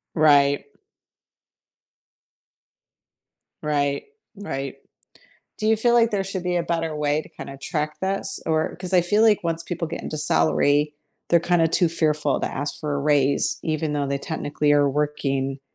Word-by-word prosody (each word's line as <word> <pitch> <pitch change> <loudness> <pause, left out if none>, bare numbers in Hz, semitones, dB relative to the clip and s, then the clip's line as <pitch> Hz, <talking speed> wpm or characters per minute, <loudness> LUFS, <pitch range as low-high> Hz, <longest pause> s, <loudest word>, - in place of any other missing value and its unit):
Right. 145 -3 +4 3.0
Right, 145 -2 0 0.3
right. 135 -9 -5 0.8
Do 215 - -2
you 220 0 +4
feel 235 +2 +2
like 230 -1 +4
there 200 -3 -1
should 190 -1 -4
be 180 0 -1
a 175 - +1
better 165 -2 -2
way 150 +1 0
to - - -15
kinda 140 - -9
track 150 0 -3
this, 195 0 -2
or 160 -1 0
'cause 185 0 -6
I 180 - +6
feel 205 +5 +2
like 215 -5 +4
once 165 0 -1
people 170 -1 -4
get 160 - -6
into 155 - -5
salary, 145 - +2 0.3
they're 170 - +4
kinda 170 -1 +2
too 175 +2 +3
fearful 150 -3 0
to - - -1
ask 145 - -4
for 150 -2 -2
a - - -1
raise 140 -1 +2
even 155 -1 -1
though 145 -1 -1
they 140 0 -1
technically 145 -1 -1
are 145 -1 +4
working 135 -2 -1
155 Hz, 160 wpm, -23 LUFS, 145-175 Hz, 3.0 s, I